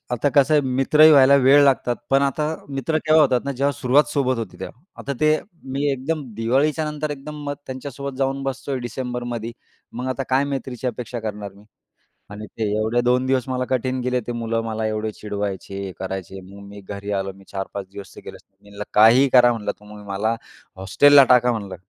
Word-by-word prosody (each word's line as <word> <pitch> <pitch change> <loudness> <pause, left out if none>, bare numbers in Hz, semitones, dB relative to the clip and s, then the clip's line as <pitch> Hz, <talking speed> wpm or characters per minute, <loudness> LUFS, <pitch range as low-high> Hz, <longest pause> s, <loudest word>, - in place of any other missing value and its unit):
आता 145 +4 0
कसं 145 +2 +4
आहे 150 - +5
मित्रही 135 +4 +4
व्हायला 140 -1 +7
वेळ 140 +2 +6
लागतात. 125 -3 +2
पण 135 +1 +4
आता 150 +2 0 0.2
मित्र 140 +3 -1
तेव्हा 155 0 +6
होतात 125 -3 +2
ना, 140 - -2
जेव्हा 140 +2 0
सुरुवात 135 +3 +3
सोबत 130 -3 +1
होते 115 - -6
तेव्हा. 125 - -8 0.2
आता 140 - -4
ते 155 0 +3 0.3
मी 140 +2 -2
एकदम 145 +3 -3
दिवाळीच्यानंतर 150 +6 -1
एकदम 145 +1 -7
मग 145 0 -3
त्यांच्यासोबत 135 +1 -7
जाऊन 135 0 -1
बसतोय 135 0 -3
डिसेंबरमध्ये. 120 -1 -5 0.4
मग 125 +2 -5
आता 130 +1 -2
काय 135 +2 +3
मैत्रीची 130 -1 -5
अपेक्षा 120 -1 -4
करणार 105 -2 -6
मी? 100 +1 -18 0.7
आणि 105 +1 -8
ते 115 - -2
एवढे 110 +3 0
2 125 +1 +1
दिवस 130 -1 0
मला 130 0 -1
कठीण 130 0 -1
गेले. 125 0 0
ते - - -2
मुलं 115 -1 -2
मला 110 0 -2
एवढे 110 0 -3
चिडवायचे, 100 -2 -5
हे 95 - -6
करायचे. 95 0 -6
मग 100 0 -12
मी 100 0 -11
घरी 100 +1 -7
आलो. 95 0 -4
मी 95 - -17
4-5 95 0 -5
दिवस 100 -1 -10
ते - - -11
गेलोच - - -10
नाही. 95 - -47
मी 100 - -17
म्हणलं, 100 0 -7
"काहीही 120 +6 +6
करा," 120 -1 +7
म्हटलं, 105 -3 -3
"तुम्ही 105 0 -13
मला 105 +4 -1 0.4
हॉस्टेलला 140 +10 +5
टाका," 125 0 +4
म्हणलं, 100 -5 -5
125 Hz, 195 wpm, -22 LUFS, 110-140 Hz, 0.7 s, व्हायला